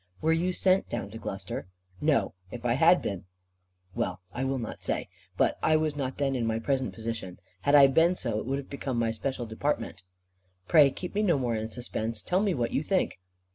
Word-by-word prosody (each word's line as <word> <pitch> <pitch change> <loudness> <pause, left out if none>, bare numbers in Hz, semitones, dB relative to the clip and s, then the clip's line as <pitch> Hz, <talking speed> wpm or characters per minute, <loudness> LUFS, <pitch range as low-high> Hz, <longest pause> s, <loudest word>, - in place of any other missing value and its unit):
"Were 160 +1 +2
you 175 +3 +1
sent 185 +1 +2
down 100 -4 -4
to 115 - -8
Gloucestershire?" 95 -3 -5 0.3
"No. 140 -9 +2 0.2
If 120 +3 -8
I 120 - +3
had 165 +7 +5
been 95 -3 -4 0.7
well, 90 -1 -2
I 125 - -2
will 135 0 0
not 115 -3 -6
say. - - -1 0.3
But - - +2
I 160 - +4
was 155 -1 +1
not 135 -2 -3
then 135 -1 0
in 120 -3 0
my 110 0 0
present 130 +3 0
position. 110 -5 -5 0.2
Had 140 +7 +4
I 140 -1 +10
been 165 +6 +4
so, 115 -9 -2
it 110 - -6
would 135 +1 0
have 140 - -6
become 135 -2 -3
my 115 -1 +1
special 120 +2 -3
department." 115 -3 -2 0.7
"Pray 150 -4 +7
keep 180 +6 -7
me 210 - +1
no 175 -8 +3
more 125 -3 0
in 110 0 -2
suspense. 115 -1 -4
Tell 185 +2 +1
me 200 -4 +1
what 120 -3 -1
you - - +1
think." 185 - 0
130 Hz, 215 wpm, -28 LUFS, 115-155 Hz, 0.7 s, I